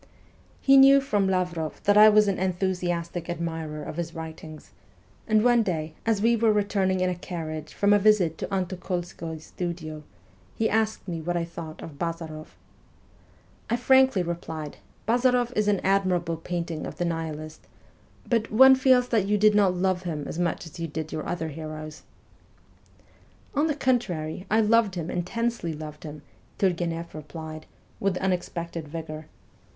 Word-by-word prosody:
He 275 0 +6
knew 275 +1 +8
from 210 -8 0
Lavroff 180 -4 -2
that 205 - +4
I 215 +1 +9
was 210 0 +5
an 195 -3 0
enthusiastic 175 -2 -2
admirer 160 -3 -4
of 150 - -7
his 170 0 -4
writings; 160 -1 -9 0.6
and 215 -1 +3
one 240 -1 +5
day, 160 -6 -2
as 215 -2 +2
we 235 +1 +4
were 225 -1 +3
returning 200 -3 +1
in 185 - +2
a - - 0
carriage 160 -3 -6
from 205 0 +3
a 205 - +5
visit 195 -6 +3
to - - -5
Antokolsky's 175 -3 -4
studio, 165 -4 -5 0.5
he 220 - +1
asked 220 -2 0
me 170 -3 -4
what 175 +2 -1
I 170 - -1
thought 165 -1 -9
of 145 -3 -10
Bazaroff. 165 -2 -5 1.1
I 235 - +2
frankly 260 -4 +4
replied, 160 -3 -5
' - - -33
Bazaroff 245 +1 +2
is 210 -1 +1
an 205 -2 +3
admirable 185 -4 +1
painting 170 -1 -4
of - - -8
the 175 - -1
Nihilist, 155 -2 -5 0.6
but 230 -2 0
one 265 +5 +8
feels 260 -1 +4
that 215 -4 +2
you 210 +1 +2
did 210 +1 +5
not 200 -3 +3
love 185 0 0
him 155 -5 -4
as 165 - -5
much 175 0 -1
as 165 0 -11
you 165 - -2
did 155 0 -5
your 155 -1 -4
other 165 -2 -2
heroes.' 155 0 -7 0.8
' - - -31
On 295 +2 +2
the 300 - 0
contrary, 185 - -1
I 220 +2 +4
loved 220 -2 +3
him, 170 -1 -4
intensely 205 0 -2
loved 150 0 -8
him,' 150 -1 -8 0.3
T\irgueneff 170 -3 -1
replied, 155 +1 -8 0.3
with 195 -2 0
unexpected 170 -3 -3
vigour. 155 0 -7
175 Hz, 165 wpm, -26 LUFS, 160-210 Hz, 1.1 s, I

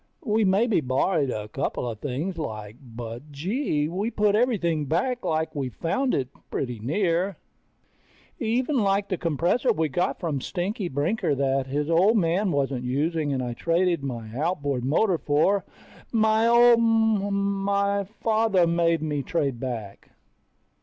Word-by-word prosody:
We 220 -1 +2
maybe 200 0 +3
borrowed 135 +3 +1
a 105 -3 -4
couple 115 - -3
of 115 -3 -5
things, 145 - -3
like. 110 -9 -6
But, 120 +3 -9
gee, 155 - -1
we 190 +7 -2
put 210 -3 +1
everything 195 - +1
back 245 - 0
like 160 0 -1
we 135 -3 -3
found 250 - -1
it, 130 -3 -1 0.2
pretty 125 -4 -3
near. 170 - 0 1.0
Even 250 +3 0
like 200 -1 +1
the 185 - -1
compressor 170 - +1
we 160 0 0
got 175 +7 -1
from 155 -6 -2
Stinky 190 - -3
Brinker 145 +4 0
that 135 -1 0
his 145 +2 -1
old 185 +7 +4
man 185 +2 +1
wasn't 135 -3 -1
using 150 +4 -1
and 130 -2 -1
I 120 -1 -3
traded 170 +4 +1
my 115 -4 -5
outboard 145 -4 -1
motor 165 - +2
for, 180 +7 +2 0.5
my 220 0 +3
old 235 0 +6
m... 205 -3 +1
my 200 0 +1
father 215 -2 +1
made 170 -1 +1
me 150 -2 -1
trade 140 -5 -1
back. 115 -6 -6
170 Hz, 145 wpm, -25 LUFS, 140-205 Hz, 1.0 s, old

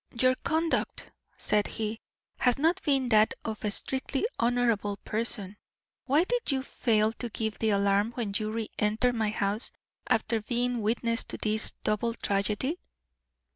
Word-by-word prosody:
"Your 255 +1 +5
conduct," 325 0 -1 0.3
said 210 -1 +1
he, 220 0 -3 0.4
"has 250 -1 +3
not 330 +6 +2
been 270 -3 +2
that 215 -1 +4
of 220 -1 -4
a 210 - +1
strictly 265 - -1
honourable 230 -4 +1
person. 210 -3 -2 0.5
Why 290 +5 +4
did 485 -1 -1
you 265 -1 0
fail 220 -5 +1
to 240 +1 -5
give 220 -1 -3
the 220 - +2
alarm 200 +2 +2
when 225 -5 -3
you 215 +1 -1
re 225 -1 -3
entered 220 +4 +2
my 220 -2 0
house 210 +1 -1 0.4
after 225 0 +2
being 245 +2 0
witness 230 +2 0
to - - -4
this 215 0 +1
double 230 +2 0
tragedy?" 210 - -1
225 Hz, 150 wpm, -29 LUFS, 210-250 Hz, 0.5 s, Your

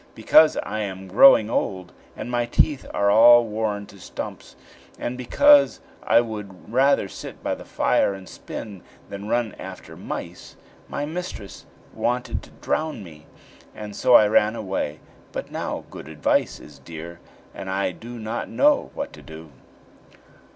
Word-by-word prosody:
"Because 155 -1 +5
I 110 - -4
am 95 -2 -5
growing 110 +3 +6
old, 95 -6 -2 0.2
and 120 - -6
my 120 -1 0
teeth 145 +3 +1
are 100 0 +2
all 120 +2 +7
worn 105 -2 -3
to 100 - -16
stumps, - - -8 0.4
and 120 - -4
because 285 - +5 0.2
I 115 - +4
would 105 -3 -8
rather 135 -4 +3
sit - - -10
by - - -1
the - - -8
fire 100 - +1
and 95 -1 -11
spin, 100 -5 -8 0.3
than 100 +1 -7
run 120 -1 0
after 95 -4 -9
mice, 85 -1 -8 0.3
my 145 - -3
mistress 155 - -7 0.3
wanted 125 +1 -2
to - - -15
drown 155 -9 -2
me; 80 -3 -14 0.5
and 105 -1 -8
so 125 - +4
I 105 - +8
ran 105 +1 +3
away. 95 -8 -4 0.3
But - - -6
now - - -4
good - - -10
advice - - 0
is 75 -2 -14
dear, 85 +4 -9 0.3
and 95 -1 -7
I 95 0 -1
do 120 +6 -10
not 110 +1 -4
know 290 0 +2
what 285 +1 -5
to - - -12
do." 80 0 -12
105 Hz, 155 wpm, -23 LUFS, 95-120 Hz, 0.5 s, I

